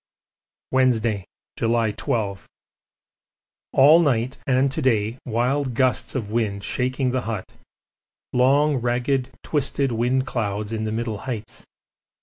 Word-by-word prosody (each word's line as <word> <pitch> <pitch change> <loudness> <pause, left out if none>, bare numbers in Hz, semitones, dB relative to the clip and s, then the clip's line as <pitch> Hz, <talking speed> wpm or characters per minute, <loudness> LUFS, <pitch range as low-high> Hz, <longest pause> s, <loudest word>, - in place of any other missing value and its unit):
Wednesday, 115 -6 +2 0.3
July 115 -1 +1
12. 100 -2 -3 1.3
All 150 +5 +7
night 130 -5 +1
and 135 +1 +3
to 155 - -2
day 115 -2 +1
wild 125 +3 0
gusts 130 +2 +1
of 110 -5 -3
wind 105 -3 -1
shaking 130 +2 -1
the 130 0 0
hut; 110 -5 -5 0.8
long, 140 +3 +3
ragged, 125 +2 0
twisted 140 -2 0
wind 125 +3 +1
cloud 105 -4 -3
in 110 -1 -2
the 110 - -2
middle 110 -2 -3
heights. 110 -3 -6
120 Hz, 120 wpm, -23 LUFS, 110-130 Hz, 1.3 s, All